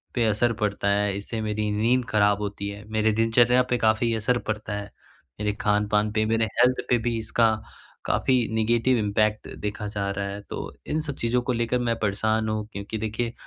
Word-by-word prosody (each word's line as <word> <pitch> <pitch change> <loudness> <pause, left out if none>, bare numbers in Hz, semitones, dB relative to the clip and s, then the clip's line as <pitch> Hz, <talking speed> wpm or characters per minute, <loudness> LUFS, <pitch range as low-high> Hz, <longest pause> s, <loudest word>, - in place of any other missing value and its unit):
पे 120 - +2
असर 110 +2 +2
पड़ता 100 -1 0
है, 100 -1 +1
इससे 110 +3 -4
मेरी 105 -1 -1
नींद 120 +4 +2
खराब 105 -1 +3
होती 100 0 -4
है, 100 +1 -8
मेरे 110 0 +2
दिनचर्या 120 +3 +4
पे 125 - +3
काफ़ी 110 +1 +2
असर 115 +3 +1
पड़ता 105 -1 -3
है, 105 0 -3 0.5
मेरे 105 -1 0
खान-पान 105 0 +2
पे, 110 0 +2
मेरे 115 0 +2
हेल्थ 125 +1 +4
पे 125 - +4
भी 115 -1 0
इसका 115 +1 +2 0.6
काफ़ी 125 -3 +2
नेगेटिव 120 +3 +2
इम्पैक्ट 105 0 0
देखा 105 0 -3
जा 100 -1 -3
रहा 100 0 -3
है। 100 +1 -6
तो - - -5
इन 155 - 0
सब 145 -3 -4
चीज़ों 125 +2 +2
को 125 - 0
लेकर 120 +1 0
मैं 115 -1 0
परेशान 110 +1 0
हूँ। 110 -1 -2
क्योंकि 100 +2 -5
देखिए 110 +2 -2
110 Hz, 190 wpm, -25 LUFS, 105-115 Hz, 0.6 s, दिनचर्या